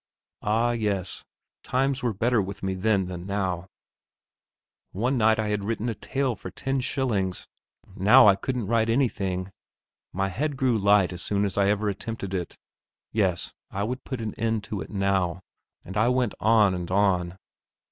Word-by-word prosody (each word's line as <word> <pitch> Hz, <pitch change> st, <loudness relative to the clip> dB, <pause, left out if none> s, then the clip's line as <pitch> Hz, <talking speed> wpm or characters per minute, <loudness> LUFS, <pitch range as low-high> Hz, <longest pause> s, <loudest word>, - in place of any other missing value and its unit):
Ah 115 Hz, +3 st, +2 dB
yes; 105 Hz, -5 st, -2 dB, 0.4 s
times 135 Hz, +1 st, 0 dB
were 120 Hz, -, 0 dB
better 115 Hz, +3 st, +2 dB
with 100 Hz, +1 st, -6 dB
me 95 Hz, 0 st, 0 dB
then 95 Hz, 0 st, +1 dB
than 90 Hz, 0 st, -7 dB
now; 95 Hz, -3 st, -2 dB, 1.3 s
one 120 Hz, +8 st, 0 dB
night 110 Hz, -2 st, +4 dB
I 110 Hz, -1 st, -1 dB
had 105 Hz, -1 st, -1 dB
written 115 Hz, +2 st, -2 dB
a -, -, -1 dB
tale 135 Hz, +4 st, -1 dB
for -, -, -8 dB
ten 135 Hz, +1 st, -2 dB
shillings, 120 Hz, -8 st, -1 dB, 0.5 s
now 120 Hz, +7 st, +7 dB
I 100 Hz, -, +7 dB
couldn't 125 Hz, +3 st, -3 dB
write 115 Hz, +1 st, +1 dB
anything. 100 Hz, -7 st, 0 dB, 0.6 s
My 95 Hz, +1 st, -1 dB
head 140 Hz, +8 st, -2 dB
grew 125 Hz, -4 st, +2 dB
light 100 Hz, -2 st, +4 dB
as 90 Hz, -, -6 dB
soon 100 Hz, +1 st, 0 dB
as 100 Hz, -, -2 dB
ever 100 Hz, +1 st, +2 dB
I -, -, +2 dB
attempted 100 Hz, -1 st, -5 dB
it. 90 Hz, -3 st, -4 dB, 0.5 s
Yes, 95 Hz, -5 st, 0 dB, 0.2 s
I 100 Hz, -, -3 dB
would 125 Hz, +4 st, -3 dB
put 130 Hz, -4 st, -5 dB
an 110 Hz, -2 st, -3 dB
end 110 Hz, -1 st, 0 dB
to 105 Hz, -3 st, -5 dB
it 80 Hz, -, -7 dB
now; 95 Hz, -3 st, 0 dB, 0.4 s
and 95 Hz, -, -8 dB
I 110 Hz, +3 st, +3 dB
went 125 Hz, -3 st, +1 dB
on 105 Hz, -1 st, +4 dB
and 90 Hz, -1 st, -4 dB
on. 95 Hz, -2 st, +1 dB
105 Hz, 170 wpm, -26 LUFS, 95-115 Hz, 1.3 s, now